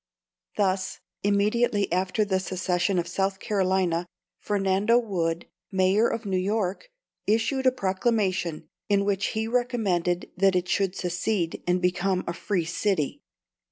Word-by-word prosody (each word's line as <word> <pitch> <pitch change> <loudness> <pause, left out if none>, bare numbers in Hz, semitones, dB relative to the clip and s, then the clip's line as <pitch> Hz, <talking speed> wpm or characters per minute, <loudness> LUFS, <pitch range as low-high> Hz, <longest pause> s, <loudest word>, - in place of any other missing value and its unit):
Thus, 190 -2 0 0.2
immediately 205 +1 +2
after 185 +4 +1
the 190 -2 +1
secession 185 0 0
of 175 -1 0
South 190 +2 -1
Carolina, 185 -4 +1 0.3
Fernando 200 +2 +2
Wood, 175 -8 -1 0.3
Mayor 190 +4 +3
of 230 - -3
New 190 -2 0
York, 200 - -1 0.4
issued 230 +5 +2
a - - +6
proclamation, 190 -7 0 0.2
in 200 -1 +3
which 200 -1 +1
he 220 0 0
recommended 215 -8 0
that 195 0 +3
it 180 0 +1
should 195 -1 0
secede, 180 0 -1
and 180 0 +1
become 180 +1 +1
a 170 - -2
"free 175 0 -1
city." 170 -2 -1
190 Hz, 130 wpm, -26 LUFS, 180-210 Hz, 0.4 s, a